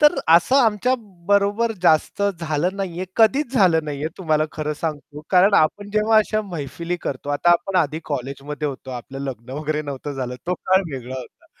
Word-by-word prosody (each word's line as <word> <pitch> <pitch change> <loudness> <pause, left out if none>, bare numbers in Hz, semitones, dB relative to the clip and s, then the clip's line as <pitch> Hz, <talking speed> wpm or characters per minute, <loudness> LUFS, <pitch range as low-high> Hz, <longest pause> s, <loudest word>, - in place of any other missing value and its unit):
तर 295 0 +6
असं 170 +11 +5
आमच्या 245 -1 +3 0.3
बरोबर 205 +3 +2
जास्त 160 +3 +3 0.2
झालं 165 +4 -1
नाहीये, 185 -2 -3
कधीच 245 +4 +3
झालं 175 -9 +4
नाहीये. 150 +1 -3
तुम्हाला 155 -4 +1
खरं 150 -1 -3
सांगतो 150 -1 -5
कारण 190 +2 +5
आपण 200 +6 +2
जेव्हा 215 +1 +3
अशा 215 0 +1
मैफिली 170 -1 -5
करतो 140 +1 -4
आता 160 +4 +2
आपण 185 +2 +2
आधी 155 -1 0
कॉलेजमध्ये 140 +2 -4
होतो, 130 -1 -8
आपलं 125 +2 -7
लग्न 130 -3 -6
वगैरे 150 +2 -2
नव्हतं 145 0 -5
झालं, 125 -2 -4
तो 180 - +1
काळ 190 +1 +2
वेगळा 130 -1 -6
होता. 125 - -12
160 Hz, 170 wpm, -22 LUFS, 145-200 Hz, 0.3 s, तर